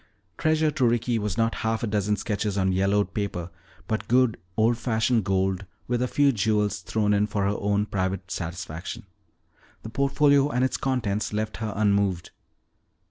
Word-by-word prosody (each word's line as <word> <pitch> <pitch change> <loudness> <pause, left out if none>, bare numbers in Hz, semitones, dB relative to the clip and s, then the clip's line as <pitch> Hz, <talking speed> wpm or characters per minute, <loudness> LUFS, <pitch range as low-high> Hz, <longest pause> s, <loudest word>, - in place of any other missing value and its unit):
Treasure 155 - +2
to 145 -3 -1
Ricky 115 0 +1
was 105 -3 -3
not 115 0 +2
half 110 0 -1
a - - +2
dozen 105 -1 0
sketches 105 -2 -2
on 95 -1 +2
yellowed 100 +1 +1
paper 95 -4 -3 0.4
but 110 - -2
good 125 -1 +3 0.2
old 115 +2 +3
fashioned 115 -1 +1
gold 95 0 0 0.2
with 120 0 0
a 125 - +1
few 140 +2 +3
jewels 105 -2 +1
thrown 105 -2 0
in 105 +1 +2
for 100 -1 -1
her 100 +1 +1
own 105 0 +1
private 95 -2 -3
satisfaction. 85 0 -5 0.8
The 110 - -6
portfolio 140 +2 +3
and 125 -1 +1
its 130 - -1
contents 110 -6 -1
left 110 +1 -2
her 110 -2 -3
unmoved. 100 -4 +1
105 Hz, 165 wpm, -25 LUFS, 100-120 Hz, 0.8 s, good